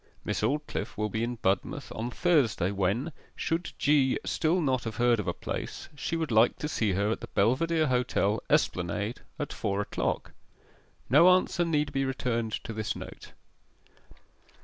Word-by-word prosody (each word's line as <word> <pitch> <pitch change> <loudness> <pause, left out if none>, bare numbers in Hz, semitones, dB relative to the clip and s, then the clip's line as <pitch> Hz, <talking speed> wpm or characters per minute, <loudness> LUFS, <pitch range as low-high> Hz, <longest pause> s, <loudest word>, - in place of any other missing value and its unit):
Miss - - -1
Aldclyffe 145 +8 -2
will 105 0 0
be 110 +2 -1
in 120 +1 -2
Budmouth 100 -3 -1
on 115 +2 -3
Thursday, 125 - +2
when 100 - 0 0.2
(should 165 +2 -2
G. 140 -3 +3
still 165 +3 +1
not 130 -6 +1
have 110 -1 -4
heard 120 -1 +3
of 100 - -3
a - - +2
place) - - -5
she 155 - -3
would 160 -5 -2
like 110 +2 +4
to 150 - -3
see 110 -9 0
her 100 +3 +1
at - - -2
the - - -6
Belvedere 155 +10 +3
Hotel, 125 -5 +1
Esplanade, 100 +6 0 0.2
at 145 -3 -4
four 100 -2 -1
o'clock. 105 - -2 0.8
No 150 +8 +7
answer 180 -1 +3
need 150 -3 0
be 135 - +1
returned 115 -4 -1
to 115 - -6
this 110 -1 -2
note. - - -10
120 Hz, 165 wpm, -29 LUFS, 105-150 Hz, 0.8 s, No